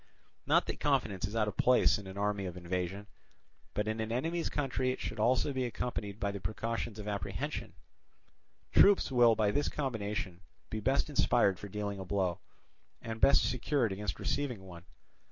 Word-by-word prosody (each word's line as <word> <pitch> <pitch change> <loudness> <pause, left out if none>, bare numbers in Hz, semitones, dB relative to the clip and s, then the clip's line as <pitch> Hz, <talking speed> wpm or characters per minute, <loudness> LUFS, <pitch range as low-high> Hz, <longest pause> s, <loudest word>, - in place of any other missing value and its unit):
Not - - +4
that - - -4
confidence 110 -10 +1
is 105 - -7
out 110 -2 +2
of 105 - -4
place 125 -3 +4
in 100 - -10
an 95 +1 -8
army 100 -1 -1
of 90 0 -7
invasion, 90 +3 -3 0.7
but 105 0 0
in 110 +1 -2
an 110 0 -2
enemy's 165 +8 -1
country 130 -3 -1
it 130 - -5
should 110 - -5
also 125 +5 +2
be 130 -1 -1
accompanied 115 -4 -3
by 100 - 0
the 100 - -5
precautions 115 +2 -3
of 105 -1 -7
apprehension: 100 -4 -4 1.0
troops 200 -7 +5
will 120 -3 +6
by 105 -2 +2
this 145 +6 +1
combination 105 - -3 0.3
be 110 - -2
best 135 +7 +1
inspired 120 -9 +3
for 100 - -8
dealing 100 0 -3
a - - -4
blow, 95 -2 0 0.6
and 115 -1 -6
best 140 - +5
secured 125 -2 0
against 105 +2 -4
receiving 125 -9 -2
one. 90 -2 -11
110 Hz, 175 wpm, -32 LUFS, 100-125 Hz, 1.0 s, will